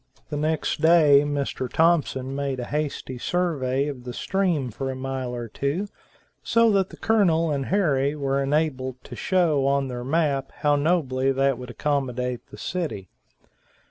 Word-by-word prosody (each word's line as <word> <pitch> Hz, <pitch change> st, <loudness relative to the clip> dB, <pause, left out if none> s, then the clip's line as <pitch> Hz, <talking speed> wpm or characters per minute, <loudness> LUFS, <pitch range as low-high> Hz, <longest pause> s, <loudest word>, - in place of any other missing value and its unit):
The -, -, -4 dB
next 155 Hz, +1 st, -1 dB
day 160 Hz, -4 st, +6 dB
Mr. 140 Hz, -3 st, -2 dB
Thompson 145 Hz, -5 st, +1 dB
made 140 Hz, -2 st, -2 dB
a 125 Hz, -, -3 dB
hasty 145 Hz, -3 st, -3 dB
survey 140 Hz, -6 st, 0 dB
of 135 Hz, -4 st, -6 dB
the 125 Hz, 0 st, -6 dB
stream 170 Hz, -7 st, 0 dB
for 135 Hz, +5 st, -4 dB
a 130 Hz, -, -3 dB
mile 130 Hz, -1 st, -4 dB
or 120 Hz, -1 st, -5 dB
two, 145 Hz, -, -2 dB, 0.5 s
so 230 Hz, -1 st, +3 dB
that 195 Hz, -2 st, +2 dB
the -, -, -12 dB
Colonel 170 Hz, -7 st, +2 dB
and 140 Hz, -2 st, -2 dB
Harry 150 Hz, -7 st, +1 dB
were 140 Hz, -1 st, 0 dB
enabled 135 Hz, -3 st, 0 dB
to -, -, -9 dB
show 160 Hz, -7 st, +2 dB
on 140 Hz, -1 st, +1 dB
their 120 Hz, -1 st, -5 dB
map 140 Hz, -1 st, 0 dB
how 145 Hz, -1 st, +3 dB
nobly 145 Hz, -4 st, +1 dB
that 135 Hz, -1 st, +1 dB
would 125 Hz, 0 st, -8 dB
accommodate 125 Hz, -2 st, -2 dB
the -, -, -12 dB
city. 155 Hz, -, -4 dB
140 Hz, 160 wpm, -24 LUFS, 130-160 Hz, 0.5 s, day